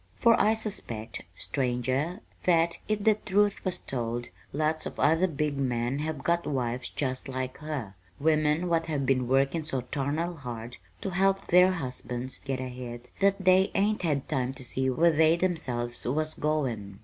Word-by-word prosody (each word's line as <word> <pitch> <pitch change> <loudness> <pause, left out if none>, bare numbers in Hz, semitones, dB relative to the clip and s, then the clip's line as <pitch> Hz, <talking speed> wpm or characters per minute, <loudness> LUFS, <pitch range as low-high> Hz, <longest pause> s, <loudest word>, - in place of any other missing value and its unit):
For 235 -1 +5
I 220 +1 +4
suspect, 120 - -4 0.2
stranger, 130 - -1 0.2
that, 170 -1 +3
if 215 -1 0
the 220 - +6
truth 205 0 +1
was 185 -2 0
told, 120 -1 -3 0.2
lots 155 +2 0
of - - -9
other 165 +5 +4
big 150 -3 -1
men 125 0 0
have 150 -3 -3
got 170 0 +1
wives 125 -3 -2
just 130 -2 -3
like 130 0 -4
her 145 -10 -4 0.3
women 155 +2 +2
what 165 -1 +1
have 145 -4 -1
been 130 -2 +2
workin' 135 +5 +2
so 135 -4 -1
tarnal 150 +7 -2
hard 120 -3 -7 0.2
to 195 - -3
help 195 +1 +2
their 180 +1 +6
husbands 130 -4 -4
get 135 -2 -2
ahead 125 -1 -6
that 195 -1 +2
they 185 +1 +6
hain't 210 +2 +2
had 150 -6 0
time 130 -3 -1
to 130 - -7
see 130 +2 -1
where 165 +7 +4
they 160 +1 +5
themselves 130 -10 -2
was 155 +5 0
goin'. 120 -11 -2
145 Hz, 165 wpm, -28 LUFS, 125-170 Hz, 0.3 s, the